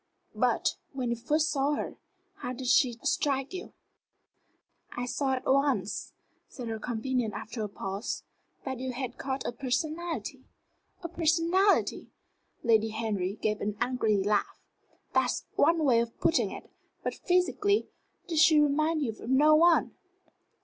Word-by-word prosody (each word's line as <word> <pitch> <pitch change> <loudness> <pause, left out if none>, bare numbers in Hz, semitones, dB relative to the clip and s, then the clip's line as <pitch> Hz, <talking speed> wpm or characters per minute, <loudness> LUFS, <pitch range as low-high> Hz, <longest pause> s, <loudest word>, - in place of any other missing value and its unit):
But, - - +1 0.2
when 255 -3 -2
you - - +1
first 305 +7 +1
saw 285 0 +1
her, - - -4 0.4
how 255 -10 -4
did 255 +1 -7
she 245 -1 +3
strike 285 -3 0
you?" 370 - -6 1.2
"I 245 - -4
saw 265 +1 -1
at 260 - -3
once," 275 +1 +1 0.3
said 245 -4 -7
her 220 -1 -3
companion 240 0 -2
after 230 +1 -6
a 210 - -3
pause, 195 +1 -4 0.4
"that 260 -2 -4
you 260 0 -3
had 255 -1 -5
caught 265 0 -3
a - - -1
personality." 315 +7 -3 0.6
"A - - -2
personality!" 340 +4 +2 0.5
Lady 225 -2 +3
Henry 210 -4 -2
gave 215 -1 0
an 205 0 -2
angry 240 -4 +1
laugh. 205 +2 0 0.5
"That's - - +1
one 330 -1 +3
way 245 -4 +5
of 235 0 -3
putting 325 - +2
it. - - -10 0.3
But - - -1
physically 400 +3 +1 0.4
did 325 -3 0
she 315 -1 +7
remind 305 +2 +2
you 235 - -1
of 220 +2 -9
no 295 +4 +5
one?" 335 +2 +4
265 Hz, 145 wpm, -29 LUFS, 230-315 Hz, 1.2 s, she